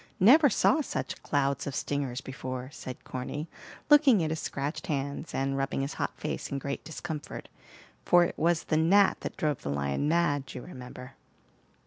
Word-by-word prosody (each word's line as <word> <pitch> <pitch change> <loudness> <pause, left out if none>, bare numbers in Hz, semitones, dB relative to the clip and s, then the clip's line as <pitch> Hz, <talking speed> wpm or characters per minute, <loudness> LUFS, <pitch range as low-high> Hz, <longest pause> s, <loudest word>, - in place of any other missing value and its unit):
Never 285 - +7
saw 315 +7 +3
such - - -4
clouds 140 -1 0
of 140 - -3
stingers 135 -3 -2
before," 130 0 -6
said 130 -1 -8
Corny, 135 +5 -5 0.4
looking 285 - +6
at 155 - -1
his 160 - -2
scratched 145 +4 -4
hands, 140 0 -3
and 135 0 -1
rubbing 135 0 -1
his 135 +2 -3
hot - - -3
face - - -3
in 140 - -1
great 140 0 -4
discomfort, 160 -1 -6 0.5
for 175 0 +6
it 175 - -1
was 165 0 +1
the 155 - 0
gnat 190 +5 +4
that - - -6
drove 150 -4 -1
the - - -4
lion 70 - -1
mad, 150 -5 +1
you 125 - -6
remember. 125 -3 -10
145 Hz, 170 wpm, -29 LUFS, 135-170 Hz, 0.5 s, Never